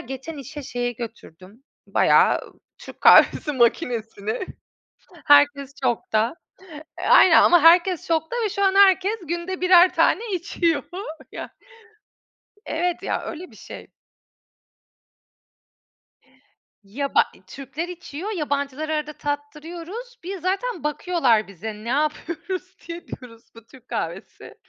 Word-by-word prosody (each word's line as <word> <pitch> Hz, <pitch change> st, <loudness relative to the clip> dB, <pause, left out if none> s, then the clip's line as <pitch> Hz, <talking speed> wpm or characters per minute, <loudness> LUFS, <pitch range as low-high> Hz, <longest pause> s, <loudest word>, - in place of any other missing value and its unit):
geçen 265 Hz, +5 st, -8 dB
işe 285 Hz, +2 st, -8 dB
şeyi 245 Hz, -2 st, -3 dB
götürdüm 220 Hz, -1 st, -11 dB, 0.2 s
bayağı -, -, +3 dB, 0.4 s
Türk -, -, -13 dB
kahvesi 295 Hz, -, +6 dB
makinesini, 235 Hz, -, -1 dB, 0.8 s
herkes 285 Hz, -1 st, +4 dB
şokta. 225 Hz, +1 st, 0 dB, 0.6 s
E, -, -, -7 dB
aynen, 370 Hz, -, +7 dB
eee, -, -, +7 dB
ama 345 Hz, -3 st, +6 dB
herkes 345 Hz, +1 st, +4 dB
şokta 320 Hz, +6 st, -1 dB
ve 430 Hz, -, +1 dB
şu 400 Hz, 0 st, -1 dB
an 385 Hz, 0 st, +3 dB
herkes 395 Hz, +2 st, +4 dB
günde 345 Hz, +3 st, -4 dB
birer 365 Hz, 0 st, +6 dB
tane -, -, +3 dB
içiyor 335 Hz, -3 st, -1 dB, 0.5 s
ya -, -, -8 dB, 1.1 s
Evet 345 Hz, +2 st, -2 dB
ya, -, -, -2 dB
öyle 355 Hz, +3 st, -8 dB
bir -, -, -17 dB
şey. -, -, -11 dB, 3.0 s
Ya, 275 Hz, +8 st, -5 dB
ba -, -, +6 dB
eee, -, -, -21 dB
Türkler 275 Hz, +5 st, -7 dB
içiyor, 355 Hz, +1 st, -7 dB
yabancılara 295 Hz, -3 st, -2 dB
arada 300 Hz, 0 st, -3 dB
tattırıyoruz, 330 Hz, +12 st, -7 dB
bir 385 Hz, +2 st, -5 dB
zaten 375 Hz, +1 st, -3 dB
bakıyorlar 290 Hz, -, +1 dB
bize 200 Hz, +3 st, -7 dB
ne 215 Hz, +2 st, -10 dB
yapıyoruz 325 Hz, +6 st, -3 dB
diye. 340 Hz, +1 st, -7 dB
Diyoruz: 230 Hz, -3 st, -11 dB
"Bu 230 Hz, -, -15 dB
Türk 255 Hz, 0 st, -19 dB
kahvesi." 185 Hz, -5 st, -6 dB
300 Hz, 120 wpm, -23 LUFS, 250-355 Hz, 3.0 s, aynen